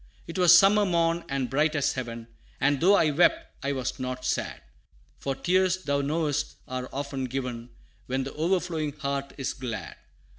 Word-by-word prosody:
'Twas 175 -1 +7
summer 205 +3 +5
morn, 170 -2 +1
and 135 -2 -1
bright 150 +4 +1
as 145 - +1
heaven; 115 -3 -5 0.3
And 145 0 +2
though 195 +4 +6
I 155 -6 +3
wept, 250 - +2
I 140 - 0
was 130 -1 -3
not 130 0 -4
sad, - - -2 0.6
For 135 -1 -2
tears, 185 +5 +1
thou 140 -1 0
knowest, 150 0 -1
are 130 0 -4
often 140 -1 -3
given 125 -2 -4 0.4
When 130 +1 -1
the 135 - -6
overflowing 165 -2 -1
heart 140 -1 -3
is 135 - -2
glad. 125 -4 -6
140 Hz, 160 wpm, -27 LUFS, 130-170 Hz, 0.6 s, Twas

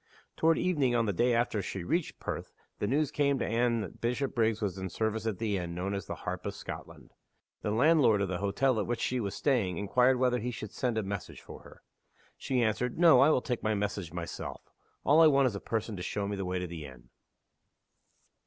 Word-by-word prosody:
Toward 165 0 +3
evening, 145 -9 +1
on 115 -1 +2
the 100 - 0
day 120 +7 +2
after 115 -3 +1
she 95 -1 -5
reached 165 - -1
Perth, - - -5 0.3
the 105 - -1
news 145 +4 +1
came 140 -1 +2
to - - -1
Anne 115 0 +1
that 95 - -8
Bishopriggs 115 -3 0
was 100 -3 -3
in 95 0 -4
service 110 +3 -2
at 105 -4 -1
the 105 -2 -1
inn 85 -2 -4
known 95 +3 -2
as 100 - -4
the - - -4
Harp - - -3
of - - -4
Scotland. - - -9 0.5
The - - -2
landlord 125 -1 +4
of - - -1
the 90 -1 -3
hotel 110 +5 +1
at 105 - -2
which 120 -1 -1
she 125 - 0
was 100 -3 -3
staying 110 - +1
inquired 125 +6 +3
whether 125 -1 +2
he 120 +3 -3
should 110 -3 -6
send 120 -3 -1
a 110 - 0
message 100 -1 -5
for - - -11
her. - - -16 0.5
She 125 -3 0
answered, 115 +3 -1
"No, 165 -6 +7
I 140 +3 +6
will 130 - +2
take 125 -2 -2
my 110 0 0
message 100 -4 -3
myself. 85 -1 -6 0.4
All 150 +3 +5
I 160 - +8
want 140 -2 +4
is 120 -6 0
a - - -3
person 110 0 -3
to - - -6
show 100 +2 -2
me 100 - -2
the 100 -1 -3
way 90 0 -2
to 90 - -2
the 85 -3 -7
inn." 65 -3 -12
110 Hz, 225 wpm, -30 LUFS, 100-125 Hz, 0.5 s, I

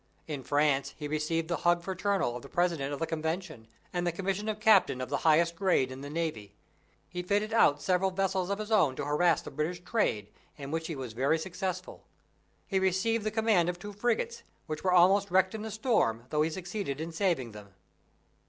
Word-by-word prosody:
In 145 -4 -4
France 140 0 +1
he 150 - -5
received 155 +2 -1
the 170 -1 -1
hug 175 +2 +2
fraternal 190 -7 -1
of 120 - -6
the 140 - -12
President 170 -6 0
of 145 - -3
the 165 - -1
Convention, 160 -5 -4 0.3
and 175 0 -1
the - - +2
commission 195 +4 -2
of 215 -1 -3
Captain 210 -11 +4
of 130 - -4
the - - 0
highest 170 +2 +4
grade 170 -8 +2
in 130 +1 -8
the 140 - -7
Navy. 145 -11 -4 0.5
He 180 - -5
fitted 205 +4 0
out 145 -10 +4
several 185 +1 +2
vessels 190 -1 -1
of 200 - 0
his 215 +1 -6
own 160 -12 +4
to 145 - -4
harass 155 +2 +2
the - - -8
British 165 +5 -3
trade, 110 - 0 0.3
in 140 -1 -7
which 160 0 -2
he 165 - -4
was 130 -4 -6
very 135 +7 +2
successful. 180 +1 -5 0.6
He 195 - 0
received 190 +4 +1
the 215 - 0
command 215 -5 +2
of 175 - -3
two 205 +3 -8
frigates, 235 +2 -1 0.2
which 155 -1 -5
were 185 - +2
almost 190 +3 +5
wrecked 185 +1 +3
in 215 -1 -5
a - - -4
storm, 215 - +1
though 150 -1 +2
he 155 - +2
succeeded 175 -4 -4
in 165 +1 -4
saving 165 - 0
them. 100 -2 -13
175 Hz, 210 wpm, -30 LUFS, 145-195 Hz, 0.6 s, almost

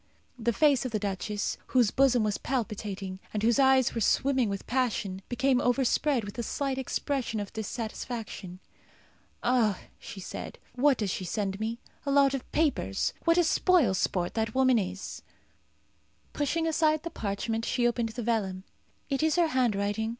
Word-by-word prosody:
The 235 +1 +1
face 280 +1 +3
of 255 - -3
the 220 - 0
duchess, 205 0 -3
whose 245 -5 +3
bosom 255 -4 +3
was 210 -1 -1
palpitating, 205 -6 -3
and 210 -1 -2
whose 235 +3 +3
eyes 265 -2 +4
were 230 - -2
swimming 260 +2 +2
with 195 -1 -4
passion, 220 -7 -1
became 255 +1 +2
overspread 255 +1 +2
with 205 +3 -7
a - - +1
slight 270 +3 -2
expression 260 -3 -2
of 205 -1 -6
dissatisfaction. 220 -3 -5 0.8
"Ah!" 235 -5 +2 0.2
she 230 -4 -9
said. 185 - -7 0.2
"What 270 +1 +3
does 205 -4 -1
she 185 - -3
send 195 +1 -2
me? 225 +2 -2 0.3
A 280 - -3
lot 275 -1 +5
of 270 - -5
papers! 275 - 0
What 335 0 +4
a 350 - +5
spoil 330 - +3
sport 180 -1 0
that 220 0 -2
woman 260 -2 +4
is!" 190 -1 -5 1.1
Pushing 310 +3 0
aside 310 -1 +2
the 335 - -5
parchment, 225 +2 -2
she 240 +1 +1
opened 235 -1 0
the 240 +2 -5
vellum. 200 -5 -1 0.4
"It 275 -1 -1
is 315 0 +2
her 345 -2 +3
handwriting. 220 -4 0
235 Hz, 165 wpm, -28 LUFS, 205-270 Hz, 1.1 s, lot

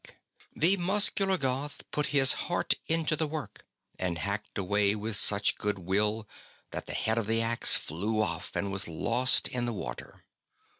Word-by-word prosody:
BENEDICT - - -23
47 - - -14
The 185 +5 +5 0.2
muscular 195 -2 +3
Goth 135 0 -4
put 150 -1 -1
his 135 -2 +6 0.2
heart - - +1
into 160 -1 +1
the 155 0 -1
work, 145 -9 -7 0.3
and 90 -2 -2
hacked 100 +2 -4
away 100 +1 +1
with 110 +1 -4
such 100 0 +3
goodwill 105 +2 -1 0.4
that - - -6
the - - -4
head 110 +1 0
of 110 - -4
the 115 0 +2
axe 115 0 +3
flew 105 +8 -3
off 85 -7 -3
and 100 - -2
was 95 -1 -2
lost 125 +10 +3
in 120 -1 -3
the 120 - -3
water. 65 - -8
110 Hz, 170 wpm, -28 LUFS, 100-135 Hz, 0.4 s, his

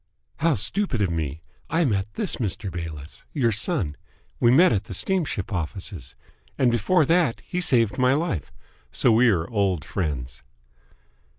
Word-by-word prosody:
"How 165 -1 +2
stupid 145 - -1
of 90 - 0
me! 80 -1 -3 0.3
I 165 +1 +2
meant 105 -3 -1
this 210 - -1
Mr. 105 -2 -3
Bayliss. 80 -3 -7
Your 125 -7 +2
son! 105 - -1 0.4
We 120 - +4
met 140 +3 +6
at 105 0 -1
the 95 - -6
steamship 145 - -1
offices. 85 - -5 0.4
And 125 -2 +3
before 145 - +2
that 165 -5 +2
he 180 - -4
saved 115 - +3
my 130 +1 +4
life. 95 - -2 0.4
So 120 - +3
we 115 +2 +5
are 85 -6 +1
old 95 -8 0
friends." 65 -8 -4
105 Hz, 155 wpm, -24 LUFS, 85-135 Hz, 0.4 s, met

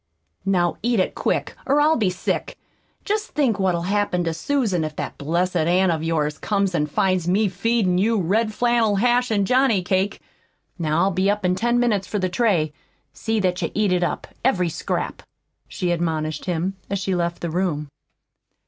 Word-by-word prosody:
"Now, 175 -3 +2
eat 235 -1 +1
it 185 - +1
quick, - - -1
or 280 +2 +3
I'll 305 +2 +4
be 210 -5 +1
sick! 180 - -3 0.5
Jest 425 +1 -2
think 255 -9 +2
what'll 180 -3 +1
happen 195 -2 0
to 165 -1 -1
Susan 195 - 0
if 155 -1 -4
that - - -5
blessed 170 +5 0
aunt 175 +3 +3
of 160 -2 -1
yours 155 -2 -1
comes 200 -3 0
an' 150 -3 +1
finds 185 +3 0
me 200 +4 +3
feedin' 195 -1 +1
you 225 +3 +2
red 215 +5 +1
flannel 235 -2 +2
hash 245 +4 +2
an' 205 -3 +1
johnny 250 -4 +3
cake! 190 +2 0 0.6
Now 155 0 +1
I'll 195 - +2
be 190 +2 +1
up 205 -1 0
in 180 - +3
ten 240 +5 +1
minutes 210 -6 +1
for 210 - -2
the 185 -2 0
tray. 175 -7 +1 0.4
See 225 -1 -1
that 180 -1 0
you - - -1
eat 205 -3 +2
it 180 - +1
up 175 - -1 0.2
every 185 -9 +2
scrap," - - -3 0.5
she 180 -1 -2
admonished 160 -2 -2
him, 180 +2 -2
as 200 - -1
she 195 0 -2
left 170 -1 -1
the 170 - -3
room. 165 -4 -1
190 Hz, 185 wpm, -22 LUFS, 175-220 Hz, 0.6 s, I'll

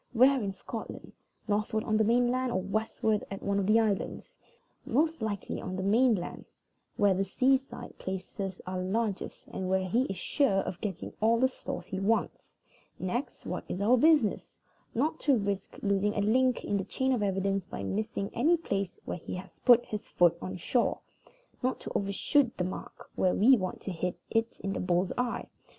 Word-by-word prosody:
Where 260 +2 +5
in 200 -2 -2
Scotland? 190 - -8 0.3
Northward 215 +1 0
on 215 - 0
the 220 - +4
main 240 +3 +3
land, 255 0 0
or 185 - +1
westward 215 +2 0
at 195 - -6
one 200 0 +1
of 190 - 0
the 220 +2 +5
islands? 210 -3 -2 0.4
Most 310 +3 +1
likely 205 -3 -3
on 185 - -4
the 190 - -3
main 230 +4 +4
land, 175 -2 -6 0.5
where 205 -2 +4
the 190 +1 +1
seaside 260 +7 0
places 190 0 -5
are 185 0 -3
largest, 200 +2 -2
and 185 -1 -4
where 190 0 +1
he 240 +8 +2
is 195 - -4
sure 195 - +2
of 175 - -6
getting 195 -5 -4
all 225 +2 +4
the 260 - +5
stores 260 - -6
he 190 - -4
wants. 220 +4 -1 0.4
Next, 240 +9 -3
what - - -3
is 180 - -3
our 215 +5 +5
business? 290 -4 +3 0.5
Not 305 +7 0
to 280 -4 +3
risk 200 -2 -3
losing 200 +1 +1
a 205 - +1
link 250 +4 +2
in 205 - 0
the 195 - -1
chain 260 +7 0
of 240 - 0
evidence 195 -1 0
by - - -6
missing 210 -1 -2
any 315 +9 +3
place 195 - -3
where - - -4
he - - -6
has 180 0 -10
put 245 -1 +7
his 210 -1 -5
foot 175 -1 +4
on 185 0 -5
shore. 235 +7 +1 0.6
Not 255 +1 0
to - - -6
overshoot 230 +6 +1
the 180 - 0
mark 180 - -7
when 185 - +1
we 255 +6 +7
want 185 -5 -3
to 195 - -4
hit 180 +1 -3
it 225 0 0
in 195 0 -2
the - - -3
bull's 180 0 +1
eye. 245 -1 -1
205 Hz, 190 wpm, -30 LUFS, 190-245 Hz, 0.6 s, put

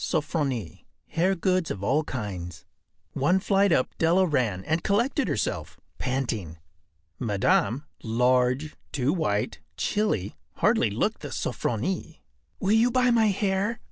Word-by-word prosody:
Sofronie. 145 - -2 0.2
Hair 185 +4 +1
Goods 185 -1 +1
of 100 - -4
All 140 +9 +2
Kinds.” 100 - -6 0.5
One 180 +8 +2
flight 195 0 +3
up 130 - +1
Della 175 +3 +4
ran, 120 - 0
and 160 +2 0
collected 240 +8 +1
herself, - - -2 0.2
panting. 115 - -2 0.6
Madame, 125 - +1 0.2
large, 125 +5 +1 0.2
too 140 +2 +1
white, 105 - -1 0.2
chilly, 205 - 0 0.2
hardly - - +3
looked - - -1
the - - -5
“Sofronie.” 120 - -2 0.4
“Will 195 - +1
you 225 +3 +5
buy 250 0 +3
my 225 -2 +4
hair? 200 +2 0
155 Hz, 125 wpm, -26 LUFS, 115-190 Hz, 0.6 s, you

